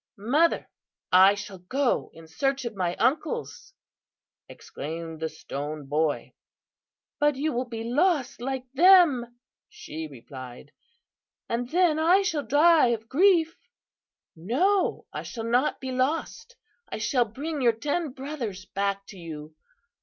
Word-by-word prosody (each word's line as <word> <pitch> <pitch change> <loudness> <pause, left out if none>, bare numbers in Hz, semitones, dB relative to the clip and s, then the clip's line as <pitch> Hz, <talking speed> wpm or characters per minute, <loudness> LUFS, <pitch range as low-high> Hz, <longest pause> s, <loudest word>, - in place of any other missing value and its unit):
"'Mother, 285 +11 +2 0.4
I 190 +2 +7
shall 200 -2 -8
go 255 +9 -1
in 165 0 -14
search 270 - -1
of 235 - -4
my 180 -2 -1
uncles,' 460 - -1 0.8
exclaimed 160 +2 -7
the 160 0 -2
Stone 145 +1 -6
Boy. 150 +1 -1 0.9
"'But 295 -1 +3
you 295 +3 -1
will 245 +1 -2
be 225 -1 -5
lost 265 +1 +1
like 265 0 -3
them,' 295 -8 +5 0.3
she 160 +1 -7
replied, 130 0 -11 0.8
'and 240 +1 -2
then 335 -1 +3
I 355 +5 +4
shall 320 -6 -1
die 295 +4 +5
of 230 -1 -2
grief.' 335 +1 +3 0.8
"'No, 290 - +1
I - - -4
shall 230 -3 -7
not 245 +5 +1
be 260 -1 -5
lost. 290 - -2 0.3
I - - -4
shall 240 +3 +1
bring 285 +7 -5
your 240 -2 +5
ten 295 +7 -2
brothers 255 -9 -6
back 200 0 -2
to 195 - -11
you. 155 -2 -8
245 Hz, 130 wpm, -26 LUFS, 185-300 Hz, 0.9 s, I